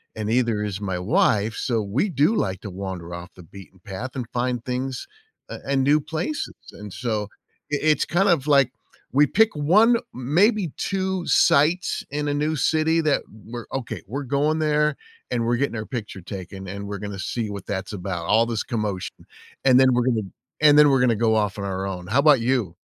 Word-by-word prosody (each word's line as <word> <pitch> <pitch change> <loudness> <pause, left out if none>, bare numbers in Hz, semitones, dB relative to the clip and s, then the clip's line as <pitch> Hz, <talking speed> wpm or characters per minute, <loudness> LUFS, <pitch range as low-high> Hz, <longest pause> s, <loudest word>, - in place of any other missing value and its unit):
and 110 -1 -3
neither 115 -3 +1
is 100 -2 -3
my 95 -3 -3
wife, 105 +3 +2
so 115 -4 -1
we 105 - 0
do 155 - +2
like 95 - -1
to 105 - -7
wander 90 -2 -6
off 85 +1 -8
the 90 - -13
beaten 95 +2 -14
path 100 +7 -6
and 125 -3 -3
find 125 -1 -1
things 130 - -4 0.4
a - - -6
and 135 -1 +2
new 145 +3 +4
places 160 - -4 0.2
and 105 -1 -9
so 110 -1 -2 0.5
i - - +3
it's 150 - +1
kinda 175 +1 +3
like 140 -4 +4 0.4
we 145 +3 +6
pick 220 +6 +3
1, 200 +11 +4 0.2
maybe 175 - +1
2 190 -2 -2
sites 165 +5 +3
in 145 +1 -2
a 145 - 0
new 150 +2 0
city 160 +4 +2
that 155 -3 +1 0.2
we're, 120 +1 -7
"Okay. 135 -4 -4
We're 140 +7 -4
going 145 +4 +1
there 150 -1 +1 0.3
and 120 -2 0
we're 120 +1 +2
getting 135 -2 -1
our 110 - -4
picture 110 -6 -6
taken, 95 +1 -8
and 100 +2 -6
we're 100 0 -4
gonna 100 -1 -6
see 110 +3 -3
what 100 -1 -7
that's 100 +1 -4
about, 90 -3 -4
all 110 +6 +4
this 115 -2 -2
commotion 105 -5 -4 0.4
and 130 -1 +6
then 130 -1 +5
we're 120 0 +1
gonna 115 -4 +1 0.4
and 150 -1 +7
then 150 -1 +7
we're 135 -1 +3
gonna 120 -2 +3
go 110 0 +2
off 105 -2 0
on 100 - -3
our 95 0 -3
own." 90 -2 -6
How 125 +8 +3
'bout 145 -3 +6
you? 115 -7 0
120 Hz, 200 wpm, -23 LUFS, 100-150 Hz, 0.5 s, and